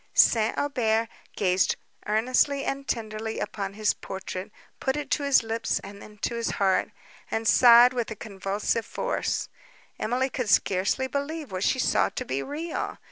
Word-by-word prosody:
St. 220 -2 +4
Aubert 230 -5 +1 0.3
gazed 185 -2 +2 0.3
earnestly 255 +6 +2
and 275 0 -3
tenderly 220 -1 -3
upon 200 -1 -4
his 215 0 +2
portrait, 190 +1 -6 0.3
put 265 - 0
it 290 -2 -5
to - - +1
his 280 -4 +4
lips, 225 0 -1
and 200 +1 -10
then 210 0 -13
to - - 0
his 235 -1 -2
heart, 195 -2 +2 0.4
and 225 0 -2
sighed 240 +1 +7
with 240 -2 -2
a 220 - -5
convulsive 205 +2 -2
force. - - -2 0.5
Emily 255 +3 0
could 250 -5 -2
scarcely 195 +7 +2
believe 285 +1 -4
what 185 0 -3
she - - +2
saw 255 - +2
to - - -5
be 135 +1 -2
real. 315 - -4
225 Hz, 160 wpm, -26 LUFS, 205-260 Hz, 0.5 s, sighed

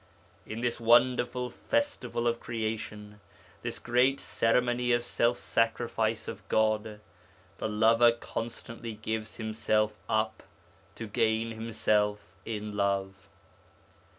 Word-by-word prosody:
'In 110 +2 -5
this 120 -1 -1
wonderful 125 +1 +3
festival 285 - -1
of 120 0 +1
creation, 110 -2 -4 0.4
this - - -4
great 125 +3 +2
ceremony 120 +1 +1
of 120 0 +2
self 120 0 +1
sacrifice 115 -1 0
of 95 - -6
God, 110 -1 +1 0.6
the - - -1
lover 115 +2 +5
constantly 115 0 -6
gives 110 0 -4
himself 110 -1 0 0.2
up 110 0 0 0.5
to 115 - -6
gain 110 +1 +1
himself 110 -2 +1 0.3
in 105 -2 -4
love.... 100 -1 -1
115 Hz, 105 wpm, -29 LUFS, 110-120 Hz, 0.6 s, lover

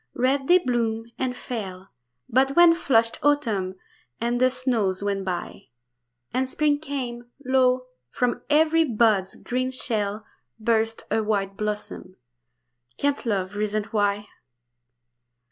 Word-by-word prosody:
Red 270 +2 +1
they 355 - +7
bloomed 235 -6 -1
and 255 -1 -2
fell; 195 -7 -6 0.4
But 270 +3 +2
when 345 -1 +8
flushed 230 -8 +2
autumn 225 -11 +1 0.4
and 240 +1 -1
the 255 - +6
snows 235 -7 0
went 200 -1 -1
by, 180 -2 -5 0.7
And 260 +1 0
spring 295 +1 +1
came, 250 -5 -5 0.2
lo, 255 -1 +3 0.2
from 245 - -1
every 320 +2 +4
bud's 215 -8 +2
green 255 +1 -2
shell 215 -4 -1 0.3
Burst 225 0 0
a 220 +1 +2
white 200 -2 -1
blossom. 210 0 -5 0.8
Can 285 0 +1
love 195 -3 -1
reason 210 0 -1
why? 205 -1 0
235 Hz, 120 wpm, -24 LUFS, 210-260 Hz, 0.8 s, when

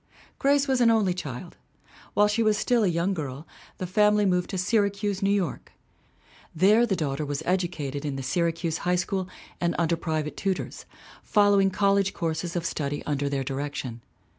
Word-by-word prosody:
Grace 280 +1 +3
was 260 -2 +2
an 235 - +6
only 215 -5 +3
child. 170 -1 -7 0.6
While 205 0 +5
she 210 +2 0
was 215 -2 +3
still 240 +1 +2
a - - +3
young 175 +3 +1
girl 145 -3 -5 0.3
the 185 - -4
family 210 +3 +3
moved 180 -2 +1
to 190 - -3
Syracuse, 200 0 0
New 195 - +2
York. 195 -6 -1 0.8
There 210 +8 +5
the 195 - +1
daughter 150 -3 -2
was 145 -1 -3
educated 165 -6 -1
in 145 -2 -3
the 135 - -4
Syracuse 165 +3 -1
High 180 0 +1
School 185 +1 -2 0.3
and 170 0 0
under 170 0 +2
private 155 -2 -3
tutors, 195 -2 -3 0.4
following 205 -2 +4
college 195 0 +2
courses 165 0 -2
of 170 -1 -2
study 145 -2 -2
under 145 -1 -1
their 140 -1 -1
direction. 135 -3 -4
180 Hz, 170 wpm, -26 LUFS, 150-200 Hz, 0.8 s, an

